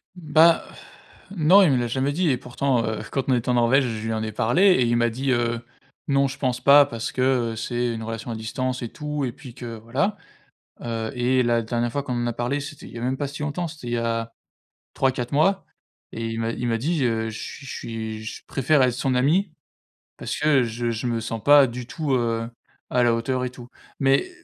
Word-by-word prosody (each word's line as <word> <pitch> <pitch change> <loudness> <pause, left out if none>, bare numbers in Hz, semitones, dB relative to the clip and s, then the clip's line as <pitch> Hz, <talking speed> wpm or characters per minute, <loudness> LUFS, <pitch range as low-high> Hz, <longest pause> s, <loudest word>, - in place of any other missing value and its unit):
Bah 160 -1 +4 0.7
non, 185 +1 +5
il 180 -7 +5
me 130 - +3
l'a 120 -1 0
jamais 130 +4 0
dit 175 +4 0
et 130 - +2
pourtant, 125 0 -1
heu, 110 -1 -2
quand 135 -1 -1
on - - +4
était 120 0 -2
en - - +3
Norvège, 120 +3 +4
je 110 -2 -4
lui 115 - -1
en 110 - -2
ai 110 -1 -4
parlé 120 - +2
et 190 -9 +6
il 120 0 +2
m'a 120 0 +2
dit: 130 +4 -2
«Heu, 120 -1 0 0.5
non 140 0 +3
je 135 - -7
pense 125 -2 -1
pas 145 +1 +7
parce 115 -4 -5
que, 130 - -2 0.3
heu, - - -7
c'est 120 +1 -2
une 110 -1 -5
relation 115 +1 -5
à - - -3
distance 130 +4 -3
et 120 - -4
tout» 150 +1 -4
et 125 - -3
puis 125 0 -12
que 120 -2 -7
voilà. 130 - -1 0.6
Heu 115 -1 -3
et 125 +1 +2
la 120 -1 +2
dernière 120 +1 -1
fois 140 +3 -2
qu'on 130 - -4
en 120 - -1
a 120 - -1
parlé, 120 +5 -1
c'était 145 0 -8
il - - -12
y 115 - -6
a - - -7
même 130 +2 -1
pas 145 - -2
si 140 +2 -8
longtemps, 150 +4 -2
c'était 150 -6 -10
il 120 - -2
y - - +1
a 115 -1 -2 0.6
3-4 125 -2 0
mois 190 +7 +2 0.5
et 115 0 -4
il 115 0 -4
m'a 115 0 -1
il 120 +1 -3
m'a 115 -1 +1
dit: 155 +5 0
«Heu, 115 -2 0
je 110 - -6
suis 140 - -8
je - - -6 0.5
suis - - -10
je 110 - -7
préfère 140 +3 +2
être 125 - +2
son 130 +1 0
ami 165 +10 +2 0.7
parce - - -4
que 150 -3 +4
je 120 0 -2
je 115 +2 -4
me 115 -1 0
sens 115 0 -5
pas 145 -1 +7
du 120 0 -7
tout, 155 -2 -2
heu, 115 -2 0 0.4
à 125 - +2
la 120 -1 +4
hauteur 125 +2 -1
et 125 - -3
tout». 125 -1 -12 0.3
Mais 135 - +2
125 Hz, 240 wpm, -24 LUFS, 115-140 Hz, 0.7 s, pas